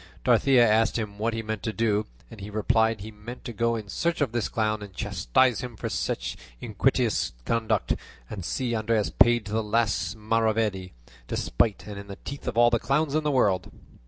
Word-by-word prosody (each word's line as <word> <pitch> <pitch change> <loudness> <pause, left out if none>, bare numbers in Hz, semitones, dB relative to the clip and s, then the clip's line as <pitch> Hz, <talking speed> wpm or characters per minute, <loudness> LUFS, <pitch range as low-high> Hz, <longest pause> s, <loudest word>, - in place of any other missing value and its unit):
Dorothea 125 0 +5
asked 110 +2 +3
him 105 -2 -5
what 115 +1 0
he 115 - -3
meant 110 -2 -4
to 110 - -2
do. 110 -1 0 0.3
He 100 -1 -8
replied 110 +1 +2
that 100 - -10
he 110 - -7
meant 110 +4 -10
to 120 - -5
go 115 +2 +1
in 110 -2 -5
search 170 - -1
of 140 -6 +1
this 120 -2 -1
clown 110 -1 0
and 100 -3 -10
chastise 120 - +1
him 125 -3 -6
for - - -4
such - - -2 0.2
iniquitous - - 0
conduct, 115 -1 +1 0.3
and 100 -4 -6
see 120 +6 -2
Andres 110 -1 0
paid 120 -2 +4
to 105 - -7
the 110 +1 +1
last 110 +1 0
maravedi, 110 -3 0 0.3
despite 100 - 0
and 105 -1 -7
in 100 - -10
the 100 - -7
teeth 140 -1 -7
of 120 -2 -2
all 120 0 +6
the 115 - +2
clowns 140 +3 0
in 155 0 +1
the 150 - +1
world. 100 - +2
110 Hz, 200 wpm, -26 LUFS, 105-120 Hz, 0.3 s, all